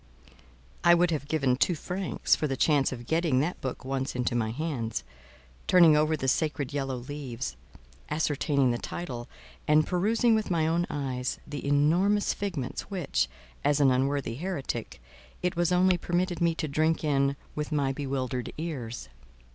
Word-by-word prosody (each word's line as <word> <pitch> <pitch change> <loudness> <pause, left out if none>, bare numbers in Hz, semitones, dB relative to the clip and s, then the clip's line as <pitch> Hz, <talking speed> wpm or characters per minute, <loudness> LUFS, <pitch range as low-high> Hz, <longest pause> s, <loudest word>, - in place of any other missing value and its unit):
I 175 0 +7
would 175 0 +3
have 145 -3 -2
given 140 -5 +2
two 170 +7 +2
francs 180 +4 0
for 155 - -1
the 135 -2 -2
chance 145 -2 +3
of 120 -2 -7
getting 160 -2 +2
that 170 +5 -2
book 130 -1 -5
once 135 -1 -2
into 125 -1 0
my 115 -2 0
hands, 120 - -3 0.6
turning 170 -4 +7
over 155 +1 +2
the 135 - -3
sacred 145 0 0
yellow 135 -2 -2
leaves, 125 - -5 0.5
ascertaining 145 -3 +1
the 120 - -2
title, 125 -9 -6 0.4
and 150 0 +5
perusing 220 +6 +2
with 220 -1 0
my 165 -3 +2
own 170 +2 +1
eyes 130 -3 -2
the 145 -1 -6
enormous 170 +9 +3
figments 175 -11 -4
which, 180 - 0 0.4
as 145 0 +3
an 140 -2 +5
unworthy 135 -1 0
heretic, 145 -9 -4 0.4
it 180 -1 0
was 175 +1 +1
only 180 0 +4
permitted 175 0 -1
me 170 -1 +3
to 160 - -2
drink 155 +3 +1
in 140 -2 +2 0.2
with 150 +1 -4
my 140 -3 +1
bewildered 130 -3 -3
ears. 130 - -5
150 Hz, 160 wpm, -28 LUFS, 130-170 Hz, 0.6 s, I